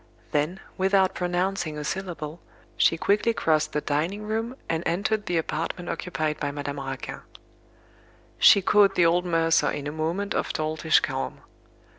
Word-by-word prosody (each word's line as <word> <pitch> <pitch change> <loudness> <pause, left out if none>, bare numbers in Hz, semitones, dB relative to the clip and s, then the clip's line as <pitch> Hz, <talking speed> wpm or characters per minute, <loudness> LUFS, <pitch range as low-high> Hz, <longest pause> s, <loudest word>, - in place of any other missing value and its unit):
Then, 155 +6 0 0.2
without 190 0 +3
pronouncing 180 -2 -1
a 150 - -4
syllable, 165 -2 -4 0.4
she 165 - +3
quickly 210 +6 +2
crossed 155 -1 +1
the 150 - 0
dining 165 +9 -1
room 225 +3 -2
and 165 -1 -1
entered 205 +5 0
the 175 - +1
apartment 165 +2 -3
occupied 155 -3 -2
by 145 - -1
Madame 145 0 -5
Raquin. 135 -1 -5 1.2
She 200 - +7
caught 200 0 +4
the 175 - +4
old 175 +2 +3
mercer 165 -3 +2
in 145 - -4
a 145 - -3
moment 165 +6 -2
of - - -1
doltish 155 +1 +2
calm. 130 0 -3
165 Hz, 150 wpm, -26 LUFS, 155-190 Hz, 1.2 s, She